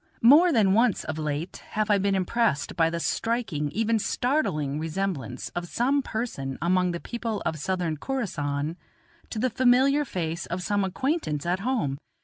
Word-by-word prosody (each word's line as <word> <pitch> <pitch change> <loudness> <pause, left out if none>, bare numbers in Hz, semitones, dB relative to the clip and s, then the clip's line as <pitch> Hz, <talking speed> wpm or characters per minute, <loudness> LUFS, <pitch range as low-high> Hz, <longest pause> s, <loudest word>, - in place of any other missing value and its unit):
More 305 +9 +7
than 210 -8 +4
once 230 -1 +3
of 155 0 -4
late 155 +3 -3
have 215 0 -2
I 205 - +4
been 195 0 +1
impressed 190 -5 0
by 165 -2 +3
the 170 0 -3
striking, 205 -8 -1
even 225 +5 +1
startling, 155 - 0
resemblance 160 - -3
of 175 0 -5
some 270 +9 +1
person 220 - -4
among 180 +1 +2
the 170 -1 -3
people 230 -1 -4
of 160 - -1
Southern 175 -1 -1
Khorassan, 155 - -2 0.5
to - - -5
the 250 +3 +1
familiar 260 +4 +4
face 170 - -3
of 180 +2 -3
some 205 +1 +1
acquaintance 190 - -1
at 180 +2 0
home. 195 - -1
190 Hz, 160 wpm, -26 LUFS, 160-235 Hz, 0.5 s, More